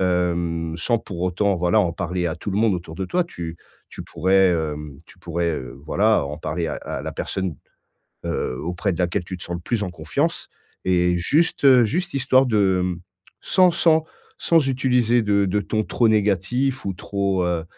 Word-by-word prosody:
hem, 85 -2 0
sans 115 +8 0
pour 90 -5 -7
autant 90 +2 +1
voilà, 85 0 +3
en 85 - 0
parler 90 0 -2
à 80 - -2
tout 95 - -5
le 100 - -1
monde 110 -2 +3
autour 85 -2 -6
de 95 +2 -4
toi. 180 0 +1
Tu 85 - -7 0.3
tu - - -8
pourrais, 95 +3 +3
hem, 75 -4 -4
tu - - -18
pourrais, 85 0 -2
heu, 65 -5 -5
voilà, 105 +5 +2
en 75 +1 -5
parler 80 +2 -3
à - - -3
à - - -5
la - - -5
personne, 95 -4 -3 0.7
heu, 65 - -2
auprès 90 +4 -2
de - - -6
laquelle 90 -1 0
tu 95 - -5
te - - -10
sens 85 - -4
le 85 - -7
plus 110 +4 -1
en 95 - -3
confiance 80 -3 -2 0.4
et 90 -1 +2
juste 135 - +4
juste 175 - -1
histoire 130 -1 +3
de, 100 -6 +2
hem, 90 -1 -2 0.4
sans 185 -1 +4
sans 160 -2 +3 0.3
sans 165 -5 +2
utiliser 125 -2 +2
de 100 -2 +2
de 100 +2 0
ton 110 +2 -1
trop 115 +2 +1
négatif 110 +6 +1
ou 100 - 0
trop, 100 0 -1
heu, 85 -2 -1
95 Hz, 190 wpm, -22 LUFS, 85-110 Hz, 0.7 s, juste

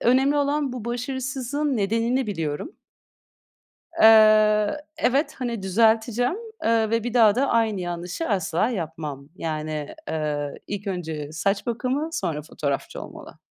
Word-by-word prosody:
Önemli 265 +4 +3
olan 285 -1 0
bu 245 -3 -6
başarısızlığın 260 +3 -2
nedenini 230 +5 +1
biliyorum. 165 - -3 1.3
Eee, 215 0 +6 0.2
evet, 285 +3 +1
hani, 235 -5 -3
düzelteceğim, 225 - +2 0.3
eee, 225 -1 +2
ve 230 -1 +1
bir 240 -1 -3
daha 220 -4 +6
da 270 +3 +2
aynı 220 -4 +1
yanlışı 175 - -4
asla 190 0 +1
yapmam. 155 - -5
Yani, 155 -2 -4
eee, 150 -2 -2
ilk 205 0 -5
önce 160 -6 -4
saç 195 +7 -1
bakımı, 255 +6 -1
sonra 160 - -2
fotoğrafçı 140 -3 -4
olmalı. - - -11
220 Hz, 125 wpm, -24 LUFS, 170-250 Hz, 1.3 s, Eee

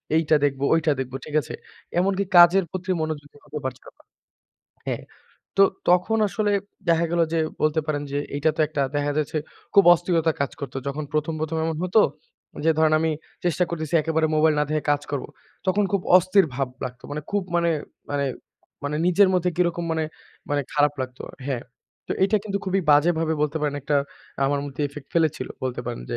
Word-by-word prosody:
এইটা 160 -1 +3
দেখবো, 135 -1 -1
ঐটা 160 -2 +3
দেখব।" 130 0 -4
ঠিক 150 - -6
আছে? - - -8 0.5
এমনকি 195 +1 +1
কাজের 175 +2 +8
প্রতিও 185 0 -2
মনোযোগী 145 -2 -5
হতে 150 +1 -6
পারছিলাম 130 0 -6
না। - - -21 0.8
হ্যাঁ, - - -2 0.5
তো 195 - +7 0.3
তখন 180 +5 +3
আসলে 210 0 0 0.4
দেখা 170 0 +4
গেল 170 0 +1
যে 165 - +1 0.2
বলতে 155 +1 +2
পারেন 145 -1 -1
যে 145 - 0 0.2
এইটা 150 +2 +2
তো - - -1
একটা, 150 -3 -1
দেখা 145 0 0
যাচ্ছে 155 +1 -1 0.4
খুব 200 - +7
অস্থিরতা 165 -2 +1
কাজ 140 - 0
করতো। 135 -2 -6
যখন 150 +2 -3
১ম, 155 +1 0
১ম 160 +1 -2
এমন 160 -1 -2
হতো। 200 +4 +4 0.6
যে 165 - +5
ধরেন 155 -1 +4
আমি 160 0 +1 0.3
চেষ্টা 175 +1 +2
করতেছি। 160 -1 -4
একেবারে 160 0 +1
মোবাইল 155 0 +4
না - - +3
দেখে 155 -1 0
কাজ 145 0 +2
করব। 140 -3 -2 0.4
তখন 200 +2 +2
খুব 195 -2 +1
অস্থির 185 +1 +4
ভাব 135 0 -1 0.2
লাগতো। 125 0 -7
মানে 150 +1 -3
খুব 205 -1 +1
মানে 170 0 +2 0.4
মানে 140 -1 0 0.6
মানে 150 +1 -1
নিজের 190 +2 +5
মধ্যে 180 0 +2
কিরকম 175 -1 +1
মানে, 160 -1 0 0.5
মানে 145 -1 +1
খারাপ 145 -1 +3
লাগতো। 130 -1 -5 0.2
হ্যাঁ, 130 -4 -2 0.4
তো - - -2
এইটা 205 +3 +4
কিন্তু 200 -2 -2
খুবই 190 0 +1
বাজেভাবে 160 +2 +3
বলতে 150 +1 0
পারেন 145 -1 -1
একটা 145 0 +1 0.5
আমার 140 0 +1
মধ্যে 145 +1 -4
ইফেক্ট 140 0 -11
ফেলেছিল। 160 -3 +1 0.2
বলতে 125 -1 -2
পারেন - - -4
যে - - -1
155 Hz, 185 wpm, -24 LUFS, 145-175 Hz, 0.8 s, কাজের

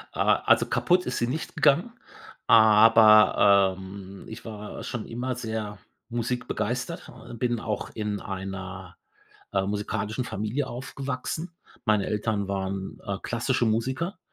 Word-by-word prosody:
Ah, - - +2
also - - +4
kaputt 180 0 +2
ist 125 - -2
sie 120 - +1
nicht 155 +6 -4
gegangen, 160 +8 +3 0.5
aber, 110 -3 +6
ähm, 95 0 -10
ich 110 +2 -9
war 105 -2 -7
schon 115 -3 -5
immer 125 +2 -3
sehr 110 -4 -5 0.3
musikbegeistert, 125 - -3
oh, 120 - -12
bin 120 0 -1
auch 105 -2 -3
in 105 -2 -2
einer, 95 -1 -6 0.6
äh, 95 -1 +1
musikalischen 105 +3 -2
Familie 110 +8 -2
aufgewachsen. 135 +6 -5 0.3
Meine 105 -3 +2
Eltern 105 -2 -1
waren, 95 0 -3
äh, 100 -1 -2
klassische 120 0 0
Musiker 130 - -1
110 Hz, 125 wpm, -26 LUFS, 100-125 Hz, 0.6 s, aber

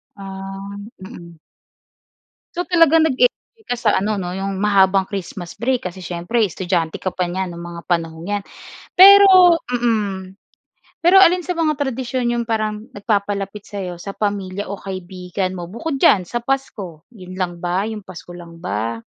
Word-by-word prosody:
Ah. 195 0 -8 0.3
Mm. 170 -5 -11 1.2
So 350 - -1
talagang 330 -2 +5
nag-eenjoy 260 - -1
ka - - -1
sa 235 -3 +1
ano 205 +3 0
'no, 175 - -4
'yong 195 +1 -3
mahabang 195 -2 +3
Christmas 185 -3 -6
break 240 -6 -1
kasi 185 0 -11
siyempre 180 +7 0
estudyante 175 -3 -2
ka 185 - -1
pa 185 0 -2
niyan 185 +1 -3
no'ng 170 0 -8
mga 170 - -8
panahong 165 0 -2
'yan. 205 -1 -1 0.5
Pero 375 -3 +8
mm. 210 -6 -1 0.7
Pero 375 +3 +7
alin 360 -1 +5
sa 360 - -1
mga 310 -2 +2
tradisyon 260 -3 -2
'yong 235 -1 -1
parang 215 -1 -2
nagpapalapit 205 -1 -2
sa'yo 185 -4 -6
sa 195 +3 -7
pamilya 200 -1 -3
o 200 - -5
kaibigan 185 0 -5
mo 175 - -5
bukod 270 - -4
diyan 200 -7 +5
sa 210 +7 -4
Pasko? 235 - -4
'Yon 185 -6 -11
lang 185 -2 -2
ba? 175 +2 -1
'Yong 215 -2 -6
Pasko 175 -1 -11
lang 170 -1 -12
ba? 115 -7 -3
195 Hz, 155 wpm, -20 LUFS, 180-240 Hz, 1.2 s, Pero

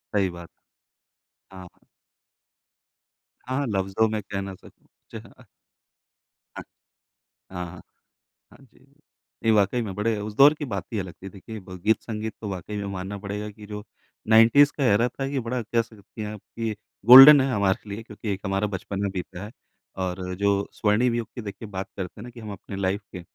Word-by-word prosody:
सही 95 -2 +2
बात। 85 -1 -10 1.0
हाँ। 95 -1 -10 1.8
हाँ, 130 +1 -2
हाँ, 145 - 0
"लफ्ज़ों 95 +1 +1
मैं 110 -1 -2
कह 100 0 -4
ना 95 0 -6
सकूँ"। - - -20 0.2
चेह - - -9
अ - - -15 1.1
हाँ। - - -6 0.9
हाँ, 90 -1 -4
हाँ। 90 +1 -10 0.7
हाँ - - -17
जी। 130 0 -23 0.6
ये 110 - +5
वाक़ई 105 +3 +2
में 105 -4 -4
बड़े 110 +1 0
उस 105 +1 -5
दौर 140 +5 +8
की 150 -1 -6
बात 100 -8 -4
ही 110 - 0
अलग 95 -3 -6
थी। 95 - -6
देखिए, 105 +3 -9
ब 90 -1 -11
गीत-संगीत 110 0 -1
तो 105 - -4
वाक़ई 95 +2 -5
में 100 - -3
मानना 95 +2 -5
पड़ेगा 105 +1 -5
कि 105 0 -13
जो 105 0 -7 0.4
90s 115 +6 +6
का 140 - 0
एरा 115 +1 +4
था, 135 - -5
ये 135 0 -2
बड़ा 125 +1 -3
कह 115 +1 0
सकती 110 -1 -12
हैं 105 0 -4
आप 105 - -9 0.2
कि 115 -2 -2 0.3
गोल्डन 135 +4 +11
है 135 - 0
हमारे 100 -1 0
लिए 105 +3 -6
क्योंकि 110 -1 -8
एक 95 - -5
हमारा 95 +2 0
बचपन 100 0 -5
में 100 - 0
बीता 90 -1 -6
है। 105 - -10 0.5
और 90 0 -3
जो 100 0 +3 0.2
स्वर्णिम 115 +3 +2
युग 115 -2 -2
की 120 - -5
देखिए 100 +1 -8
बात 95 -1 -5
करते 95 +1 -6
हैं 105 - -8
ना 125 - -9
कि 120 0 -13
हम 110 -2 -7
अपनी 100 0 -8
लाइफ़ 95 +2 0
के, 90 - -7
105 Hz, 195 wpm, -25 LUFS, 95-115 Hz, 1.8 s, गोल्डन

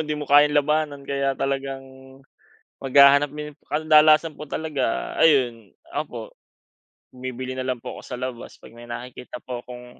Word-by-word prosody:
di 150 0 -3
mo 150 - -5
kayang 145 +1 +5
labanan 145 -1 0
kaya 140 -1 -1
talagang 135 0 -3 1.0
maghahanap 140 +1 +6
mi 150 +1 -7 0.2
kadalasan 155 +1 +4
po 150 - -6
talaga, 145 -5 -3
ayun, 120 - +2 0.2
opo, - - -5 0.8
bumibili 130 0 -6
na 130 - -3
lang 130 -2 -3
po - - -8
ako - - -11
sa 125 - -6
labas 125 -2 -7
pag 115 - -15
may 120 - -11
nakikita 125 +1 -8
po 125 -1 -6
akong 125 0 -10
135 Hz, 150 wpm, -23 LUFS, 125-150 Hz, 1.0 s, maghahanap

